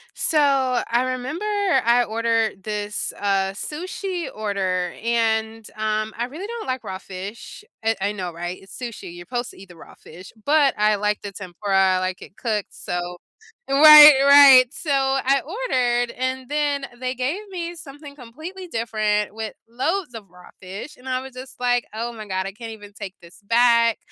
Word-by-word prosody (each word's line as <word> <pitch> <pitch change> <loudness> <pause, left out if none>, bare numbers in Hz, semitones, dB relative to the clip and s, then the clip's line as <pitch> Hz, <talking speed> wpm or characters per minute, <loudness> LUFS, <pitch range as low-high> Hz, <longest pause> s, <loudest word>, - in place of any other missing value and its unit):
So, 315 - +1
I 260 -4 +2
remember 260 +9 -5 0.4
I 240 +1 +4
ordered 225 -2 -1
this, 210 -1 -3
uh, 195 -1 0
sushi 355 - -5
order, 190 -4 -2
and, 225 -1 -1
um, 215 0 -2
I 235 - -2
really 305 +10 -8
don't 465 +1 -6
like 255 -1 -3
raw 190 0 -6
fish. 195 - -9 0.2
It 225 0 0
I 200 +2 -1
know, 185 -4 -5
right? 175 +2 -6
It's 195 - -9
sushi, 235 -8 -7
you're 175 0 -10
'posed 240 +4 -4
to - - -18
eat 195 -1 -14
the 175 - -14
raw 165 - -15
fish, 180 +4 -14
but 290 -2 +3
I 210 0 +3
like 210 0 -1
the 205 - -6
tempura, 190 0 0
I - - 0
like 185 0 -3
it 195 - -13
cooked, 215 -4 -3
so 175 0 -4 0.5
right, 295 0 +9
right, 275 -3 +8
so, 305 - -4
I 270 0 +2
ordered, 250 - -1
and 260 0 -3
then 290 -2 -1
they 255 0 -3
gave 295 - -3
me 345 -2 -5
something 290 -2 -11
completely 315 +9 -10
different 215 -6 -1
with 220 0 -6
loads 280 +7 -2
of 215 -4 -10
raw 180 +1 -17
fish, 195 +10 -8
and 260 +1 -10
I 255 0 -1
was 265 0 -10
just 255 +1 -11
like, 245 -1 +1
"Oh 235 +2 -4
my 215 -2 -9
god, 190 -1 -2
I 195 - -4
can't 225 +2 -8
even 205 -2 -12
take 195 -2 -8
this 170 +3 -16
back." 235 +1 +3
230 Hz, 180 wpm, -22 LUFS, 205-270 Hz, 0.5 s, right